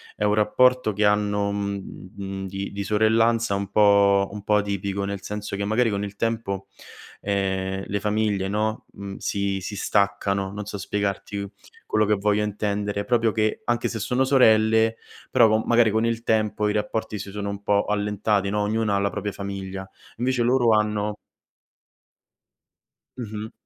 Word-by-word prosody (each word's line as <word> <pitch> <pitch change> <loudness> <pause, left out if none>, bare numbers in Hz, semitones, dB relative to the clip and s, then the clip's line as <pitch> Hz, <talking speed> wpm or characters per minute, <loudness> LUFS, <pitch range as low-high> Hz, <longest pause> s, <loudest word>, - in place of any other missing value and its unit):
è - - -3
un 105 0 +3
rapporto 110 +2 +3
che 105 +1 +1
hanno, 105 0 +1
mhmm, 100 -1 -5
di 95 +1 -5
di 100 0 -4
sorellanza 110 +2 +2
un 100 -1 -2
po' 100 -1 +4
un 105 -1 -8
po' 105 - +2
atipico, 100 -1 -1
nel 100 -1 -4
senso 105 0 -5
che 100 - -3
magari 110 +3 +2
con 100 0 -2
il 100 0 -6
tempo, 110 -4 -2 0.5
ehm, 95 -1 -1
le 100 - -2
famiglie, 105 -2 0
no, 110 +2 -1
mhmm, 100 -1 -7
si 100 -1 -2
si 105 +3 -5
staccano, 100 -1 0
non 105 0 -6
so 100 - -6
spiegarti 100 0 -3 0.4
quello 110 0 +2
che 105 - +3
voglio 105 +1 +1
intendere, 105 -1 -2
proprio 115 -3 +2
che, 110 0 0
anche 120 -1 0
se 115 - -4
sono 125 +5 +1
sorelle, 110 -4 +4 0.3
però 120 -3 +5
co 110 +1 +3
magari 120 -2 +4
con 110 +2 +1
il 115 0 -2
tempo 110 -2 +1
i 105 - 0
rapporti 105 0 -2
si 100 - -6
sono 100 0 -4
un 100 0 -5
po' 100 0 +2
allentati, 105 -1 0
no, 105 +1 0
ognuno 105 0 0
ha - - +2
la 100 0 0
propria 105 +2 -3
famiglia. 95 -1 -6 0.3
Invece 125 +1 0
loro 120 -1 +3
hanno 105 -1 +1 2.0
Mh-mh. 110 -2 -6
105 Hz, 165 wpm, -24 LUFS, 100-110 Hz, 2.0 s, però